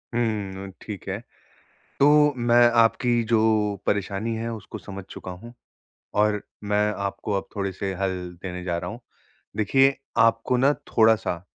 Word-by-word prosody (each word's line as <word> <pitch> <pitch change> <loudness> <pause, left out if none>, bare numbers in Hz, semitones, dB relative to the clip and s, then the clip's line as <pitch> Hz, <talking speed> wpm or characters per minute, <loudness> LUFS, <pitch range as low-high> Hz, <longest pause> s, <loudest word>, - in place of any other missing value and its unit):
हुँ, 100 -5 -2
अ, - - -9
ठीक 105 -3 -8
है। 95 +1 -2 0.8
तो 150 +1 +6
मैं 120 0 +5
आपकी 120 +1 +3
जो 115 0 +2 0.5
परेशानी 105 +3 -1
है 115 +1 -3
उसको 110 -3 -8
समझ 100 -1 -8
चुका 95 - -8
हूँ, 105 +7 -10 0.6
और 105 0 +2 0.2
मैं 105 +1 +2 0.2
आपको 100 +2 -4
अब 95 - -4
थोड़े-से 100 -1 -3
हल 95 -1 +1 0.3
देने 90 -1 -5
जा 85 -2 -1
रहा - - -5
हूँ। 115 +2 -8 0.6
देखिए, 135 +6 +3 0.2
आपको 115 +2 +3
ना 135 +3 +4 0.2
थोड़ा-सा, 110 -6 +3
105 Hz, 145 wpm, -24 LUFS, 95-120 Hz, 0.8 s, तो